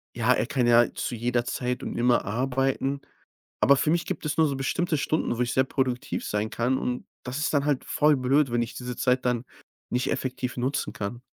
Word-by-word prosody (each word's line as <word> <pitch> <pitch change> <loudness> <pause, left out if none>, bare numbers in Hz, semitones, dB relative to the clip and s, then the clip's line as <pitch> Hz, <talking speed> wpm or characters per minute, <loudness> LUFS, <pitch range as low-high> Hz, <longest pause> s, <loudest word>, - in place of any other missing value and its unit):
„Ja, 120 +1 +3
er - - +1
kann 125 -1 0
ja 120 0 +5
zu 120 - -3
jeder 120 +1 0
Zeit 125 0 -2
und - - -5
immer 120 0 +3
arbeiten.“ 135 +4 0 0.6
Aber 140 - +6
für 145 - +1
mich 170 +1 +2
gibt 190 - -4
es 150 - -2
nur 160 - +5
so 140 - -2
bestimmte 155 +5 0
Stunden, 155 -5 0
wo 120 - -2
ich 125 0 0
sehr 130 - +4
produktiv 130 -2 -2
sein 105 +1 -1
kann 125 +3 +1
und 125 0 -3 0.2
das 130 +2 -4
ist 150 - 0
dann 140 0 +2
halt 145 -3 +1
voll 150 0 +3
blöd, 135 +1 +2
wenn 120 0 +1
ich 115 - -4
diese 125 -1 -5
Zeit 125 -1 +1
dann 125 0 0 0.4
nicht 125 +1 0
effektiv 130 -1 -3
nutzen 130 +3 -1
kann. 110 +4 -5
125 Hz, 215 wpm, -26 LUFS, 120-140 Hz, 0.6 s, Aber